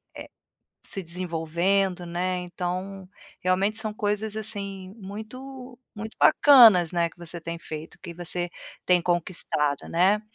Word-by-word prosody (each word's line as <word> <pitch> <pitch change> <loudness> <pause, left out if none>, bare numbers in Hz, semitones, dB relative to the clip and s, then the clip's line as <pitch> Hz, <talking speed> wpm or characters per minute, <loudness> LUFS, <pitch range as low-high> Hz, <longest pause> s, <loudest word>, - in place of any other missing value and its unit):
eh, - - -9 0.6
se 195 - -5
desenvolvendo, 175 +2 -1
né. 180 +2 -2
Então, 185 +2 -5 0.3
realmente 195 +4 +1
são 215 -1 -2
coisas, 210 +1 -2
assim, 200 -3 -5
muito, 250 +6 -9 0.2
muito 220 +1 -7
bacanas, 225 - +7
né, 170 -1 +1
que - - -22
você 170 0 -7
tem 170 +1 -5
feito, 155 0 -8
que 175 -2 -8
você 175 0 -4 0.3
tem 180 -1 +4
conquistado, 170 -4 -1
né. 190 +5 +3
185 Hz, 130 wpm, -26 LUFS, 175-210 Hz, 0.6 s, bacanas